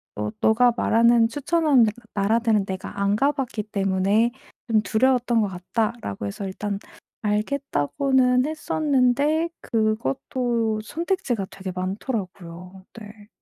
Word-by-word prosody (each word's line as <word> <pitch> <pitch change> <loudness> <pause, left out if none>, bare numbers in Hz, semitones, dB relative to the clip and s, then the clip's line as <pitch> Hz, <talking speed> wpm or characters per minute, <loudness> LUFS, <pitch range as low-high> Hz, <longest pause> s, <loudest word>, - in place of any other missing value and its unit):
"어 105 0 -2
너가 235 +2 +4
말하는 230 0 +4
추천하는 290 -1 +3 0.3
나라들은 215 0 +2
내가 190 +1 -6
안 200 +1 +2
가봤기 270 -4 0
때문에 200 +3 +1 0.4
좀 220 -2 +3
두려웠던 240 +1 +2
것 210 - +1
같다."라고 190 - -3
해서 195 - -5
일단 200 +1 -4 0.5
"알겠다."고는 255 - +1
했었는데 300 0 +1
그것도 220 - -1
선택지가 320 - -2
되게 190 -1 -6
많더라고요. 185 -2 -5
네. 210 0 -13
220 Hz, 275 characters per minute, -23 LUFS, 200-255 Hz, 0.5 s, 너가